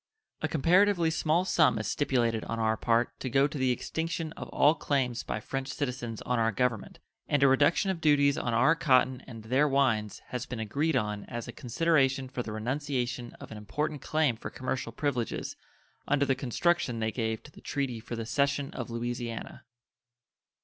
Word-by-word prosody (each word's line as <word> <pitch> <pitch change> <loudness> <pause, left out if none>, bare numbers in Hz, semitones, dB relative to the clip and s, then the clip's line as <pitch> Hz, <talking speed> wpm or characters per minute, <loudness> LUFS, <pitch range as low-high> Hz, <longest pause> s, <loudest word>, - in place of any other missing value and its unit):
A 155 - +1
comparatively 170 +3 +3
small 160 +3 +1
sum 165 -8 +3
is 110 - -3
stipulated 120 -4 +1
on 115 - -3
our 110 -1 +1
part 115 +2 0
to 130 - -3
go 135 +2 +4
to 145 - -3
the 130 -1 +2
extinction 160 +5 -2
of - - -8
all 150 - +4
claims 130 -6 -1
by 110 - -4
French 135 +4 -4
citizens 125 -6 -4
on 125 -1 0
our 115 0 +2
Government, 110 0 -1 0.3
and 145 -1 +2
a - - +7
reduction 145 +8 +3
of 175 -3 -5
duties 140 -2 +4
on 120 - -2
our 120 +8 +4
cotton 130 -5 +3
and 115 -3 -9
their 130 +6 +2
wines 120 -7 +1
has 125 -2 -4
been 120 - -5
agreed 140 +8 0
on 105 -4 -1
as 120 0 -6
a - - -5
consideration 135 -1 +1
for 130 -1 -4
the 110 - -6
renunciation 125 +1 -2
of - - -12
an 110 - -7
important 150 +7 -3
claim 155 -5 +1
for - - -7
commercial 130 +1 -3
privileges 125 -6 -2 0.5
under 145 0 +2
the 135 - +2
construction 135 +1 0
they 110 0 -1
gave 110 0 -2
to 150 - -14
the - - -15
treaty 135 -5 -2
for 120 +1 -6
the 115 -1 -4
cession 140 +3 0
of 120 - -6
Louisiana. 120 0 -5
130 Hz, 185 wpm, -29 LUFS, 115-145 Hz, 0.5 s, a